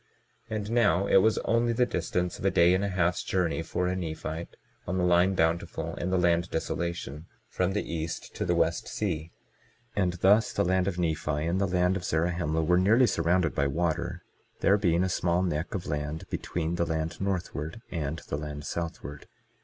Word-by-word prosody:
22:32 110 - -2
And 105 +1 -4
now, 100 -6 +3
it 100 - +5
was 110 +3 +4
only 115 +1 +2
the 125 +2 +3
distance 90 -3 -2
of - - -5
a - - +5
day 90 -1 +5
and 95 +2 +1
a - - +1
half's 90 -2 +1
journey 90 -3 0
for 90 +2 -2
a 90 +1 0
Nephite, 80 -1 -5 0.3
on 95 - -1
the 90 - +1
line 90 +2 +4
Bountiful 80 0 0
and 90 - -3
the 95 - +2
land 85 0 +2
Desolation, 85 -1 -3 0.2
from 90 +1 0
the 105 - 0
east 85 0 -4
to - - -3
the - - +1
west - - +1
sea; 85 -6 -3 0.6
and 90 -3 +1
thus 100 +5 +3
the 100 - +1
land 95 +1 +2
of 95 -3 -2
Nephi 80 -3 -1
and 90 +4 0
the 100 - +2
land 90 +1 +2
of 90 - -7
Zarahemla 80 -1 0
were 90 +3 +3
nearly 110 +7 +5
surrounded 85 -4 +1
by 70 - +1
water, 80 +3 -1 0.4
there 100 +1 +4
being 85 -3 +2
a - - +1
small 90 0 +1
neck 85 +1 -2
of 90 - -3
land 75 +4 -3
between 85 0 -2
the 85 - +1
land 80 +2 -2
northward 90 -1 -3
and 80 -2 -3
the 70 - -2
land 75 -1 -6
southward. 80 -3 -5
85 Hz, 195 wpm, -28 LUFS, 80-95 Hz, 0.6 s, it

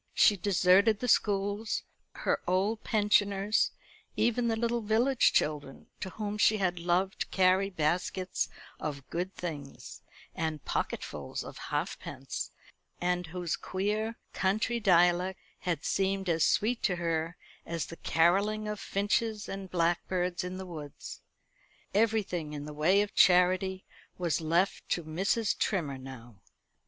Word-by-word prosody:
She 210 - +6
deserted 195 +2 +4
the 250 - -2
schools, 205 0 +1 0.3
her - - -1
old 195 +5 +1
pensioners, 205 -1 +2 0.5
even 235 0 +2
the 225 - +1
little 235 +1 0
village 230 +5 +3
children, 145 -3 -1
to 190 - -4
whom 210 +1 -4
she 215 +1 +5
had 180 -3 0
loved 180 +3 0
to - - -1
carry 190 +1 +3
baskets 180 +2 -1 0.3
of 140 -3 -5
good 180 +3 -3
things, 145 -6 -7 0.3
and 160 -3 -3
pocketfuls - - -3
of - - -9
halfpence, - - -4 0.5
and 180 -1 0
whose 175 0 -2
queer 210 +4 -2 0.2
country 215 +5 0
dialect 180 -2 +3 0.2
had 170 -5 -2
seemed 195 -1 0
as 165 -1 +2
sweet 230 +3 +2
to 180 - +1
her 165 0 -2 0.3
as 170 -3 -3
the 165 - -10
carolling 200 +6 +2
of 210 -1 -3
finches 210 +2 -1
and 195 -1 -6
blackbirds 175 +1 0
in 180 +1 -5
the 190 - -6
woods. 155 -5 -8 0.7
Everything 200 -7 +1
in 145 -1 -5
the 150 - -7
way 180 +7 +3
of 205 - -7
charity 185 +1 +4 0.3
was 170 -3 0
left 170 +5 0
to 175 - 0
Mrs. 195 +7 0
Trimmer 150 -10 -1
now. 120 -4 -11
185 Hz, 135 wpm, -30 LUFS, 170-205 Hz, 0.7 s, She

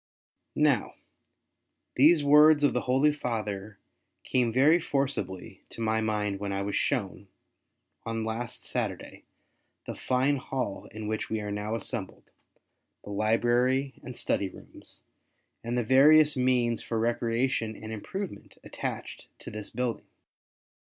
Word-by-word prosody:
Now, - - +2 1.0
these 150 +3 +5
words 150 +1 +6
of 145 - +4
the 125 - 0
Holy 140 +4 +4
Father 105 -6 -4 0.5
came 125 -3 +1
very 145 +8 +5
forcibly 135 - -3
to - - -11
my 110 0 +1
mind 105 -2 -1
when 100 0 -3
I 100 0 -2
was 100 0 -3
shown, 100 -7 -1 0.8
on 115 -1 -3
last 115 +1 -5
Saturday, - - -4 0.6
the - - -5
fine 130 +3 +1
hall 125 -6 -4
in 110 0 -8
which 110 0 -3
we 110 - -1
are 105 -1 -5
now 105 +2 -3
assembled 105 -4 -5 0.3
— - - -52
the 105 - -8
library 120 +6 +1
and 125 -2 -9
study 100 - -1
rooms, - - -14 0.6
and 120 +1 -2
the 120 - +1
various 150 +4 +6
means 125 -3 +1
for 115 - -3
recreation 115 0 0
and 110 +1 -8
improvement 190 - -7
attached - - -6
to - - -10
this 105 -1 -6
building. 125 -2 -3
120 Hz, 135 wpm, -28 LUFS, 110-135 Hz, 1.0 s, words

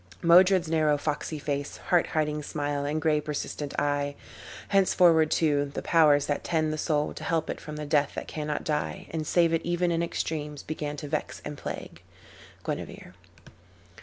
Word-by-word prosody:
"Modred's 180 +1 +6
narrow 155 -2 +2
foxy 150 +1 -3
face, 145 -1 -3
Heart 175 -2 +2
hiding 150 -1 -1
smile, 145 -1 -2
and 150 +2 -1
gray 155 -1 +2
persistent 145 -1 -4
eye: 145 0 0 0.5
Henceforward, 175 -5 +4
too, 145 -3 +2
the - - -3
Powers 150 -4 +4
that 145 - -2
tend 155 -2 0
the - - -3
soul 150 -2 0
To - - -8
help 165 -4 0
it - - -7
from 150 0 -7
the 150 0 -5
death 145 -1 +1
that - - -5
cannot 150 -1 -3
die, 150 -1 -2
And 155 -2 -3
save 170 -2 +3
it 165 - +2
even 175 0 0
in 165 0 +1
extremes, 150 -3 -3
began 150 -1 -4
To 145 - -6
vex - - -3
and 150 - -5
plague." - - -7 0.6
Guinevere. - - -5
150 Hz, 170 wpm, -27 LUFS, 145-165 Hz, 0.6 s, Modred's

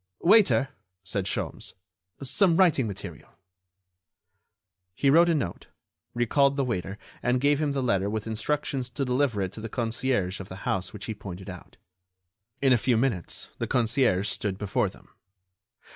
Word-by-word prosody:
"Waiter," 190 -8 +5 0.3
said 95 0 -3
Sholmes, - - -4 0.5
"some 165 +5 +3
writing 160 -10 +4
material." 100 -5 -8 1.7
He 135 +6 +3
wrote 170 +3 +6
a 165 - +3
note, 95 - -3 0.5
recalled 140 +4 +3
the 140 - +1
waiter 95 -4 -3 0.2
and 125 +1 +1
gave 145 +2 +2
him 145 -2 0
the 135 -2 -1
letter 100 -5 +1
with 110 0 -3
instructions 130 +3 -2
to 135 +3 -3
deliver 125 -5 +1
it 95 +1 -4
to 110 - -8
the 115 - -5
concierge 115 -4 -1
of 95 - -8
the 95 +2 -9
house 95 0 -1
which 105 - -8
he 110 - -3
pointed 95 -2 -8
out. 90 - -12 0.9
In 135 -2 +6
a 120 - +3
few 120 0 +2
minutes 115 - -2
the - - -2
concierge 115 -5 +2
stood 105 -2 -1
before 100 -1 0
them. - - -18
120 Hz, 160 wpm, -27 LUFS, 100-140 Hz, 1.7 s, wrote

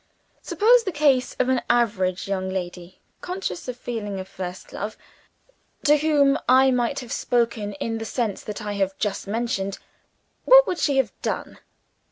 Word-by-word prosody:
Suppose 470 +3 +4
the 385 - -2
case 285 -5 +2
of 255 - +1
an 260 -1 +2
average 200 -7 +1
young 190 -1 -2
lady 180 -1 -6 0.2
(conscious 365 -3 -5
of 250 -1 -5
feeling 210 -6 -5
a 185 - -5
first 185 -1 -8
love) 210 +2 -5 0.9
to 295 0 +5
whom 290 -2 +3
I 260 +1 +6
might 250 +2 0
have 245 - -10
spoken 230 -4 0
in 225 +3 -3
the 225 - -5
sense 225 -4 -2
that 210 +1 -6
I 210 -1 -3
have 195 -1 -1
just 200 -1 -3
mentioned 200 -3 -2 0.7
what - - +8
would 360 -5 -3
she 280 -3 +1
have 265 -6 +1
done? - - -4
235 Hz, 165 wpm, -24 LUFS, 195-275 Hz, 0.9 s, what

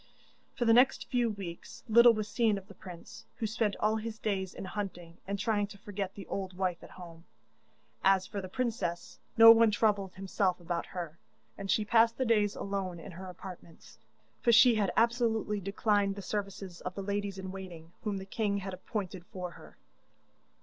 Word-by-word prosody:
For 240 - -1
the 225 - +6
next 250 +3 +4
few 245 -2 +2
weeks 190 -5 -8
little 235 +1 +8
was 215 -1 -3
seen 225 -4 +2
of 195 0 -9
the 200 - -12
prince, 180 -2 -11
who 225 - -3
spent 220 -1 0
all 215 +1 +2
his 220 0 -5
days 195 -4 -2
in - - -6
hunting, 180 -4 -6
and 200 +1 -2
trying 205 0 0
to 200 - -12
forget 195 -1 -5
the 200 - -8
old 190 -2 -5
wife 185 -2 -1
at - - -11
home. 170 -2 -12 0.8
As 190 -1 +4
for 200 0 -5
the 185 - -7
princess, 195 -7 -3 0.2
no 225 0 +11
one 230 0 +6
troubled 205 -3 +1
himself 190 -1 0
about 170 0 -3
her, 170 -3 -6 0.4
and 195 -1 -7
she 215 - +2
passed 230 +1 +4
the 260 - 0
days 210 -3 +2
alone 195 -3 -3
in 190 +4 -9
her 185 +2 -9
apartments, 175 - -11 0.4
for 235 - +4
she 235 +2 +7
had 205 -4 +1
absolutely 225 -3 +2
declined 200 +1 +1
the 200 - -7
services 195 -3 -5
of 180 - -5
the 195 - -4
ladies 200 0 -2
in 190 -1 -6
waiting 175 -4 -9
whom 210 -3 -2
the 190 - -6
king 200 0 -1
had 195 -1 -5
appointed 185 -1 -5
for 180 -2 -6
her. - - -15
200 Hz, 190 wpm, -31 LUFS, 185-215 Hz, 0.8 s, no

